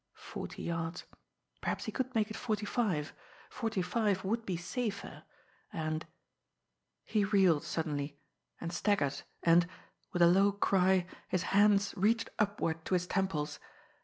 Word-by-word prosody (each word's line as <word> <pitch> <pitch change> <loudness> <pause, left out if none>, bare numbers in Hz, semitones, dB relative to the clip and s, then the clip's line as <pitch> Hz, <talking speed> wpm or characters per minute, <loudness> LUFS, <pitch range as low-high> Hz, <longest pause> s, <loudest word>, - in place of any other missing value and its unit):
Forty - - -7
yards! 165 0 -3 0.6
Perhaps - - -2
he - - -3
could 260 -1 -3
make 215 -1 +1
it - - -5
forty 215 -3 -2
five! 190 - 0 0.4
Forty 225 -5 -1
five 205 -1 +1
would 225 +3 -1
be 180 -3 -1
safer; 200 +4 -4 0.5
and 155 0 -3 1.0
he 215 -2 +1
reeled 190 -6 +4
suddenly, 145 -3 -2 0.4
and 170 0 -4
staggered, 150 -9 +1 0.2
and, 170 +1 +5 0.4
with 175 - +3
a - - +8
low 195 +3 +5
cry, 190 -2 +3 0.2
his 185 -1 0
hands 200 0 +5
reached 225 +4 +2
upward 195 -6 0
to 185 - +1
his 180 0 +1
temples. 180 -6 -1
190 Hz, 135 wpm, -33 LUFS, 165-210 Hz, 1.0 s, a